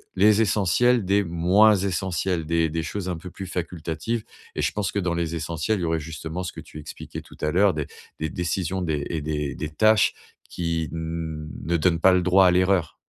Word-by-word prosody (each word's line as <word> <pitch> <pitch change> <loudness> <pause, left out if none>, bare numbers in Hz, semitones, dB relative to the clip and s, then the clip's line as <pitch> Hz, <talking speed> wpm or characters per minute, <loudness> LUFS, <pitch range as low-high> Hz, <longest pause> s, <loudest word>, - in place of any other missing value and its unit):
les 105 +3 +5
essentiels 110 +4 +3
des 100 +2 +3
moins 90 +6 +4
essentiels, 95 -2 -1
des 85 0 +1
des 80 +1 -2
choses 95 +2 -4
un 90 - -2
peu 90 +3 -9
plus 95 - -7
facultatives. 90 +5 -3 0.3
Et - - -1
je - - +1
pense 100 -4 -2
que - - -2
dans 90 -3 0
les 85 -1 -2
essentiels, 85 +5 -1
il - - -4
y - - +1
aurait 80 0 0
justement 80 +2 -6
ce 90 - -5
que - - -8
tu 75 - -11
expliquais 75 - -8
tout - - -16
à 75 - 0
l'heure, 95 +2 +4
des 75 -2 -2 0.3
des 80 - -2
décisions 90 +3 -2
des 75 -4 -1
et 80 -3 -2
des 75 -2 -2
des 75 - -4
tâches 110 +7 +4 0.4
qui 85 -2 -2
ne 80 -1 -3
donnent 85 0 +2
pas 95 +2 +6
le 90 - +3
droit 95 +1 +5
à - - +5
l'erreur. 90 -2 +2
85 Hz, 210 wpm, -24 LUFS, 80-95 Hz, 0.4 s, pas